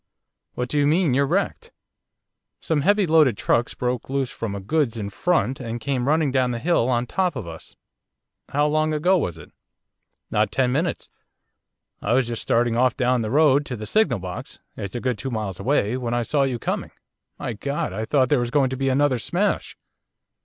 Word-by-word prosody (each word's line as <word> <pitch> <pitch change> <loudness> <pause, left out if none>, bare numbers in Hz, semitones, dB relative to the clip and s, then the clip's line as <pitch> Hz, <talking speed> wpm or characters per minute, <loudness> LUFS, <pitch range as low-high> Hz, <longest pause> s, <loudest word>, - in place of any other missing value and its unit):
'What 125 - -2
do 145 +4 0
you 145 - +3
mean 160 0 +3
by 125 - +2
you're 140 0 +2
wrecked?' - - -1 0.9
'Some 155 -3 0
heavy 205 +4 +3
loaded 155 - +4
trucks 120 0 0
broke 125 -1 -2
loose 135 -2 -1
from 110 -3 -4
a - - -4
goods 115 +4 0
in 100 -2 -4
front 135 - 0
and 120 -2 -5
came 130 +1 -2
running 155 -1 +2
down 130 -1 +2
the 120 - -2
hill 140 -3 +1
on 120 -1 +1
top 180 +2 -1
of 125 - -5
us.' 80 -1 -10 0.7
'How 145 +1 +1
long 155 +1 +1
ago 180 +6 +3
was 90 - -1
it?' 80 - -13 0.8
'Not - - +1
ten 125 -1 +1
minutes. 160 +6 -2 0.9
I 105 - 0
was 130 -1 +2
just 115 -1 -3
starting 120 0 +1
off 125 +1 +2
down 125 -2 +2
the 110 - -2
road 145 +1 +4
to 125 - -4
the 105 -1 -7
signal 170 - +2
box, 90 -1 -7 0.2
it's 100 +1 -6
a 120 - -3
good 125 -5 -1
two 135 - -3
miles 105 -6 -4
away, 125 -4 +1
when 120 -2 -2
I 120 - 0
saw 145 +4 0
you 130 -3 -2
coming. - - -3 0.5
My - - -4
God! 140 +7 -3
I 110 - -3
thought 130 0 +2
there 145 - +3
was 120 -1 -1
going 135 -1 +2
to 130 - -3
be 135 0 0
another 135 -1 +2
smash. 190 - -1
130 Hz, 205 wpm, -23 LUFS, 120-150 Hz, 0.9 s, loaded